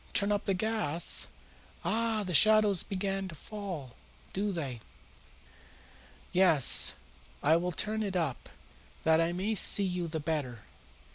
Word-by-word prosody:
"Turn 200 0 0
up 205 -1 -1
the 195 - 0
gas? 185 -6 +1 0.6
Ah, 225 -1 0
the 180 -2 -5
shadows 215 0 +5
begin 195 0 -3
to 170 - -10
fall, 175 - -8 0.4
do 205 +2 -1
they? 140 -9 -5 1.5
Yes, 175 -7 +4 0.5
I 155 +3 +4
will 180 +1 -2
turn 215 +5 -2
it 200 -3 -3
up, 160 -9 -3 0.5
that 160 0 +3
I 165 +1 0
may 190 +5 -2
see 205 -1 +4
you 180 -2 -2
the 160 0 -4
better." 145 -7 -4
185 Hz, 135 wpm, -30 LUFS, 160-205 Hz, 1.5 s, shadows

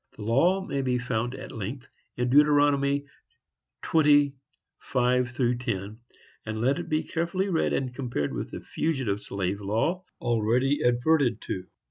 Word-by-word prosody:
The 105 - -7
law 170 - +2
may 140 -5 -2
be 125 -2 0
found 125 0 -2
at - - -8
length 120 +4 -6 0.3
in 125 0 0
Deuteronomy 145 -1 +4 0.8
20:5–10; 125 - 0 0.5
and 110 0 -4
let 130 +5 +1
it - - -6
be 155 0 +1
carefully 180 +4 -1
read 165 -4 +1
and 130 -2 -1
compared 120 - -3
with - - -4
the - - -7
fugitive 130 -11 -2
slave 100 0 -3
law 115 - 0 0.2
already 120 +4 +1
adverted 120 -1 +2
to. 90 -1 -5
125 Hz, 130 wpm, -27 LUFS, 115-145 Hz, 0.8 s, Deuteronomy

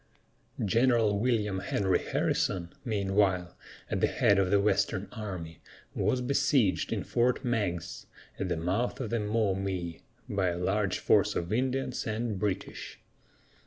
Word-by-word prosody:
General 115 -1 +3
William 105 -5 +1
Henry 95 -1 +1
Harrison, 85 -2 -1
meanwhile, 95 -5 +1 0.3
at - - -2
the - - +4
head 100 -1 +3
of 95 -1 +2
the 100 +1 +4
western 100 -1 +1
army, 90 -8 -6 0.3
was 125 - +1
besieged 135 -5 +2
in - - -1
Fort 125 +2 +1
Meigs, 90 -8 -2 0.3
at 95 - -2
the 85 - 0
mouth 95 +9 -1
of 120 -5 -4
the 115 - +1
Maumee, 95 -5 -1 0.3
by 100 -5 0
a 85 -1 -1
large 90 - 0
force - - +3
of 85 +4 -2
Indians 130 +1 -1
and 110 -2 -2
British. 100 -2 -3
100 Hz, 135 wpm, -29 LUFS, 95-115 Hz, 0.3 s, the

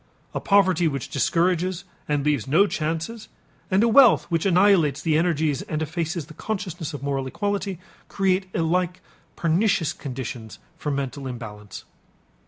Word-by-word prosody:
A - - -2
poverty 190 -4 +3
which 140 -5 -3
discourages 175 +5 +1 0.3
and 145 -1 0
leaves 145 -7 +1
no 165 +9 +5
chances 165 +6 -3 0.4
and 195 +2 +3
a - - +4
wealth 240 0 +6
which 165 +3 +1
annihilates 180 -6 +4
the 160 -2 +1
energies 160 -3 +1
and 155 - -4
effaces 160 +1 -3
the 155 - -13
consciousness 175 -5 -4
of 140 - -8
moral 135 -1 -2
equality, 200 +4 -2 0.3
create 190 -1 0
alike 175 +2 0 0.3
pernicious 170 -1 +1
conditions 125 -4 -7 0.2
for 155 -2 -4
mental 140 -1 -3
balance. 105 -4 -9
165 Hz, 140 wpm, -24 LUFS, 145-185 Hz, 0.4 s, wealth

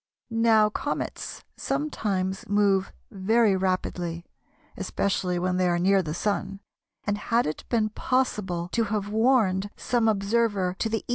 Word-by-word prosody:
Now 225 -1 +4
comets 290 +6 -4
sometimes 200 -11 -2
move 200 -2 +2 0.2
very 210 +2 +3
rapidly 180 -2 -2 0.5
(especially 185 -2 -1
when 180 +1 0
they 185 -1 +2
are 175 - +2
near 190 +2 +3
the 155 -3 -4
Sun), 195 0 -2 0.4
and 205 0 -1
had 235 +3 +1
it 155 - -4
been 220 -3 +2
possible 210 -8 -1
to 230 - +1
have 205 -1 -2
warned 215 -4 +2
some 235 -2 +1
observer 205 -3 +1
to 225 - 0
the 225 0 -2
E. - - -34
200 Hz, 140 wpm, -26 LUFS, 185-225 Hz, 0.5 s, Now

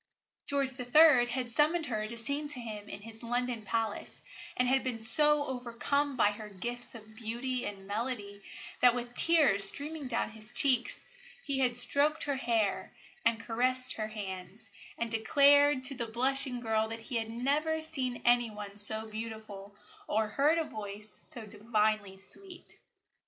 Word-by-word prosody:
George 275 -2 -1
III. 250 0 +5
had 245 0 -3
summoned 310 +6 +1
her 215 -5 -3
to 235 +2 -8
sing 280 +6 -3
to 290 -3 -7
him 215 -3 -8
in 200 - -8
his 225 0 -9
London 245 0 -2
palace, 220 0 -3 0.4
and 250 - +2
had 265 +1 +2
been 255 -3 -3
so 295 +6 +7
overcome 260 +3 -2
by 210 -3 +3
her 210 0 -9
gifts 240 +6 -2
of 220 -1 -13
beauty 240 +3 -4
and 195 -1 -9
melody 205 -1 -5 0.4
that, 245 -1 +5
with 240 0 -6
tears 290 -11 +3
streaming 295 -1 -2
down 230 -2 -1
his 215 0 -3
cheeks, 255 -1 0 0.4
he 275 -2 -1
had 245 -2 +2
stroked 285 +5 +3
her 285 -2 -2
hair 230 -6 -1 0.3
and 230 0 +1
caressed 255 +2 +1
her 215 -1 -4
hands, 200 0 -9 0.3
and 235 -1 -4
declared 280 +4 +4
to 260 - 0
the 240 -3 -4
blushing 260 +2 -1
girl 220 -1 0
that 225 +1 -7
he 235 +2 -4
had 225 -1 -3
never 295 +7 -1
seen 260 -6 -2
any 240 -1 +3
one 205 -1 -9
so 220 +2 +4
beautiful 215 -2 -9 0.3
or 215 0 0
heard 295 +7 +2
a 330 - 0
voice 210 -4 -8
so 240 -7 +2
divinely 210 -2 -2
sweet. 355 - -1
235 Hz, 160 wpm, -30 LUFS, 220-270 Hz, 0.4 s, so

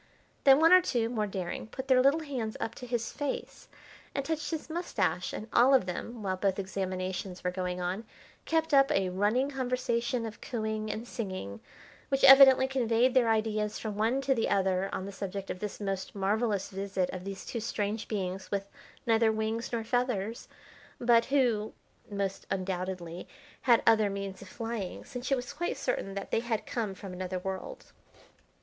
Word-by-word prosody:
Then 270 0 +8
one 325 +3 +7
or 370 - +9
two, 235 -9 0
more 215 -3 -1
daring, 190 0 -4
put 260 +4 -7
their 260 -1 +5
little 280 +5 +4
hands 250 -7 -4
up 225 - -3
to 250 - -9
his 235 -1 -2
face 290 -2 -5 0.5
and 275 - -1
touched 320 0 -2
his 320 -2 -4
moustache, 230 - -1
and 215 - -6
all 255 +3 +6
of 255 - +3
them, 215 +5 -5
while 190 -1 0
both 190 0 +1
examinations 185 -1 -3
were 180 - 0
going 180 -1 -3
on, 180 +4 -2 0.4
kept 320 -1 0
up 275 -1 +6
a 190 -1 +2
running 215 +9 +1
conversation 250 -2 -1
of 220 -1 -8
cooing 220 -2 -3
and 225 +3 -4
singing 185 - -5 0.5
which 270 0 0
evidently 270 -1 +9
conveyed 245 -1 +2
their 250 -3 +4
ideas 215 -1 0
from 215 -2 -4
one 225 +6 +1
to 270 0 +2
the 230 -3 0
other 190 -1 +1
on 190 - -3
the 200 - -6
subject 195 0 -5
of 180 - -6
this 210 0 -5
most 195 -2 -3
marvellous 205 +1 0
visit 195 -1 -1
of 185 -1 -6
these 195 0 -6
two 235 - -4
strange 215 -1 -2
beings 190 -2 -3
with 200 -1 -2 0.4
neither 225 -1 +4
wings 220 +1 -2
nor 230 -2 -1
feathers, 235 -3 -1 0.5
but 235 -1 +4
who, 245 -6 +1 0.4
most 200 -2 -3
undoubtedly, 185 -2 -3 0.3
had 235 -3 +4
other 220 -2 +5
means 195 -1 -5
of 200 - -10
flying, 225 -2 -5
since 250 -1 -6
it - - +5
was 255 +2 -5
quite 345 +1 -2
certain 250 -7 -2
that 200 - -5
they - - +3
had 230 -2 -2
come 215 -5 -3
from 190 -1 -8
another 185 0 -3
world. 190 - -6
220 Hz, 180 wpm, -30 LUFS, 195-250 Hz, 0.5 s, or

